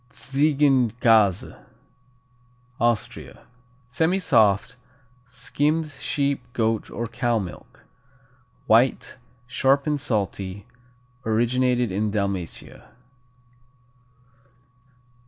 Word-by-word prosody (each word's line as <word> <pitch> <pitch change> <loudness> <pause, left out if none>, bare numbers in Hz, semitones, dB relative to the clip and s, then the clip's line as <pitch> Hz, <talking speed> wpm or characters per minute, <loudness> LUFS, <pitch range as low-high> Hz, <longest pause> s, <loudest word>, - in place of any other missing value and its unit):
Tzigenkäse 125 - +2 1.2
Austria 120 -2 -2 0.4
Semisoft; 125 - +2 0.5
skimmed 150 +6 -1
sheep, 140 -1 -1
goat 115 -3 -1
or 120 - -4
cow 120 0 -1
milk. 95 -5 -8 0.8
White; 120 +4 +2 0.3
sharp 135 +2 +1
and 150 -2 -1
salty; 100 -5 -3 0.6
originated 120 +1 +1
in 105 +3 -1
Dalmatia. 100 -4 -4
120 Hz, 65 wpm, -23 LUFS, 105-135 Hz, 1.2 s, Tzigenkäse